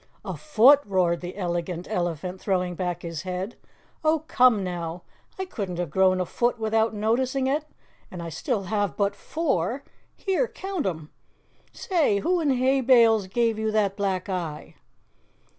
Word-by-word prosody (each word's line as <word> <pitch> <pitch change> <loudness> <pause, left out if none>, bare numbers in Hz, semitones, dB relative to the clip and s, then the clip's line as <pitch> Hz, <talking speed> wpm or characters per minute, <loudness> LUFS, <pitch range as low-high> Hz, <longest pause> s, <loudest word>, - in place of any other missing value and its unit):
"A - - -4
foot," 280 -1 +6
roared 180 -5 +1
the 180 +2 -7
Elegant 175 -1 -3
Elephant, 180 -2 -3
throwing 180 -3 0
back 180 -1 -3
his 165 -2 -5
head. 185 +3 -4 0.5
"Oh, 310 0 +2
come 245 -5 +4
now, 175 -1 -4 0.3
I 380 - -3
couldn't 195 - -5
have 175 -4 -3
grown 185 +1 +3
a 180 - 0
foot 240 +6 0
without 220 0 +1
noticing 250 +5 0
it, 290 +3 0 0.4
and 180 - -8
I 170 0 -5
still 210 - -2
have 205 0 -1
but 200 -1 +1
four 275 - -1 0.3
here, 390 +5 0
count 380 - -4
'em! 160 -4 -5 0.6
Say, 330 - +1
who 350 - +1
in 310 -3 +1
hay 265 +1 +2
bales 230 -5 +5
gave 225 +2 0
you 220 0 0
that 205 -3 +1
black 195 -2 -1
eye?" 170 -6 -4
205 Hz, 160 wpm, -25 LUFS, 180-255 Hz, 0.6 s, foot